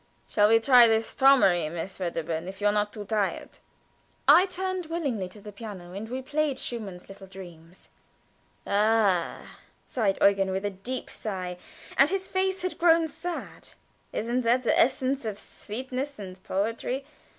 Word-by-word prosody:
"Shall 210 -1 +3
we 225 0 +6
try 245 0 +7
this 225 0 +1
'Traumerei,' 195 - +5
Miss 175 +4 -6
Wedderburn, 165 -2 -3
if 190 +1 -8
you 205 - -3
are 205 - +4
not 210 0 0
too 210 -1 -8
tired?" 210 -1 -2 0.7
I 370 - +7
turned 370 -1 -3
willingly 275 - -2
to 210 - -13
the 210 +1 -10
piano, 200 -5 -9
and 210 +3 -6
we 260 +2 -4
played 295 0 0
Schumann's 205 -9 -6
little 195 0 -12
"Dreams." 175 -2 -13 0.8
"Ah," 205 -4 +2 0.5
said 210 -6 0
Eugen, 195 -1 +4
with 190 +1 -2
a 205 - -1
deep 235 +7 -6
sigh 185 -4 -5 0.4
(and 275 +2 +6
his 385 0 -2
face 380 0 -1
had 365 - -3
grown 330 -1 +5
sad), 345 +3 -7 0.4
"isn't 240 +3 -1
that 245 +2 +2
the - - +2
essence 265 +2 +2
of 215 -3 -4
sweetness 260 +8 -6
and 185 -2 -9
poetry? 230 +7 -2
220 Hz, 160 wpm, -27 LUFS, 195-265 Hz, 0.8 s, try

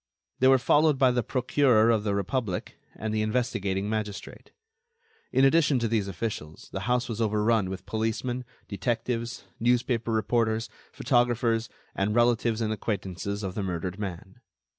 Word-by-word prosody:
They 130 - +5
were 135 0 +7
followed 150 +3 +3
by 130 -1 +4
the 125 0 +1
Procureur 125 -2 +3
of 110 -2 +1
the 100 -2 0
Republic 100 -1 -2 0.2
and 110 0 -4
the 110 - +1
investigating 105 -4 -1
magistrate. 105 -2 -5 0.8
In 130 +2 +4
addition 145 -1 +4
to 115 -1 0
these 110 -3 0
officials, 85 -5 -5
the - - -4
house 125 0 +1
was 115 -1 -4
overrun 105 -2 +2
with 95 0 -6
policemen, 115 +3 -2 0.2
detectives, 115 +4 -2 0.2
newspaper 120 -1 +1
reporters, 110 +1 +1 0.2
photographers, 120 -2 +1 0.2
and 105 +2 -1
relatives 120 -1 +2
and 110 -1 0
acquaintances 100 -1 -3
of 95 -2 -3
the 105 - -3
murdered 90 0 -3
man. 95 +2 -7
110 Hz, 145 wpm, -27 LUFS, 100-120 Hz, 0.8 s, were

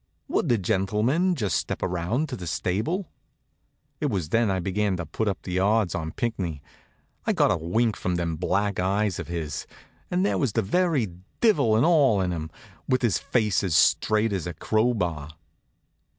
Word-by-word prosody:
Would 155 - 0
the 120 - +4
gentlemen 110 - +1
just 100 - 0
step - - -3
around 90 - -1
to 130 - -4
the 90 -6 -7
stable? 140 - -2 0.9
It 150 - 0
was 95 - -2
then 115 +1 +2
I 95 -1 0
began 95 +1 0
to 90 - -4
put 105 +8 -3
up 95 -3 -2
the 90 0 -2
odds 105 -1 +2
on 80 -2 -3
Pinckney. 95 -10 -3 0.7
I - - +2
got - - +3
a - - +2
wink 105 +7 0
from 90 -1 -2
them 85 -2 -1
black 100 +4 0
eyes 100 +1 0
of - - -5
his, 80 -4 -4 0.4
and 180 +2 +1
there - - +1
was 135 -8 0
the - - +1
very 150 - +1 0.3
divil 145 - +4
an' 115 - +4
all 145 - +4
in 90 -2 0
'em, 80 -2 -4 0.4
with 130 0 +2
his 115 -5 +2
face 105 -5 +1
as 90 -5 0
straight 110 +5 +3
as 90 -3 -2
a 85 - -5
crowbar. 90 -9 0
100 Hz, 180 wpm, -25 LUFS, 90-120 Hz, 0.9 s, the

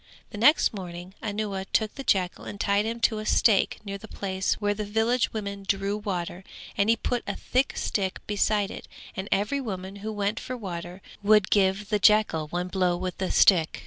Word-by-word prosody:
The 205 - -7
next 295 +4 +5
morning 180 -2 -7
Anuwa 205 -2 -3
took 215 -2 +1
the 275 - -7
jackal 185 -7 0
and 205 - -7
tied 200 +1 +2
him 230 +1 -3
to 220 -2 +2
a 215 - -6
stake 215 -4 +3
near 200 0 -5
the 220 - -11
place 190 -2 -2
where 205 -1 0
the 210 +1 -4
village 225 +4 +1
women 200 -2 -5
drew 200 +1 0
water 185 -3 -4 0.3
and 200 +2 +2
he 230 - +5
put 245 +1 -2
a - - -2
thick 255 +2 0
stick 190 -2 -1
beside 205 -1 +1
it - - -9 0.3
and 190 +2 -5
every 210 +8 +1
woman 190 -4 -6
who 215 +2 -5
went 205 0 -1
for 255 0 -5
water 180 -3 -7 0.2
would 210 -1 +4
give 195 0 +2
the 210 -1 +1
jackal 210 -7 +4
one 175 +3 -3
blow 180 -2 +1
with 185 0 -5
the 190 - -1
stick. 170 -5 +4
200 Hz, 200 wpm, -26 LUFS, 190-215 Hz, 0.3 s, next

